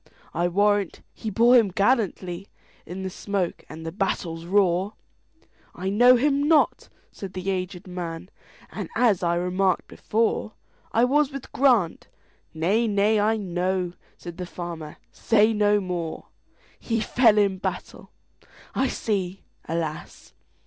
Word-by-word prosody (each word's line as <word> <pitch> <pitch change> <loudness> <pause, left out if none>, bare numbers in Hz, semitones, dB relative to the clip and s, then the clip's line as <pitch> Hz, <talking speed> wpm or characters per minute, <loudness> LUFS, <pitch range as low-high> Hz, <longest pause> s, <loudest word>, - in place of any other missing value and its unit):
I 175 +2 +1
warrant 205 +1 +1
he 220 - -5
bore 235 +5 +5
him 225 -5 +5
gallantlyIn 195 -4 0 0.6
the 190 - -3
smoke 195 -2 -3
and 160 +1 -9
the 165 - -4
battle's 170 -3 -2
roar!""I 190 - -3
know 245 +5 +6
him 280 +3 +2
not," 315 -2 +3 0.2
said 190 -2 -8
the 185 +1 -2
aged 185 0 -4
man,"And, 180 -1 -8
as 220 -7 +3
I 170 -1 +1
remarked 180 +1 0
before,I 225 +1 -2
was 285 +3 +3
with 275 -1 -8
Grant"—"Nay, 215 - 0
nay, 210 +1 +2
I 220 +2 +2
know,"Said 180 -2 -4
the 180 -1 -5
farmer, 170 -4 -7
"say 220 0 +3
no 210 -1 +3
more:"He 180 +5 -6
fell 225 0 +4
in 200 -2 +2
battle,—I 265 +7 -6
see, 195 -6 -2 0.3
alas! 160 -2 -5
195 Hz, 115 wpm, -25 LUFS, 175-220 Hz, 0.6 s, know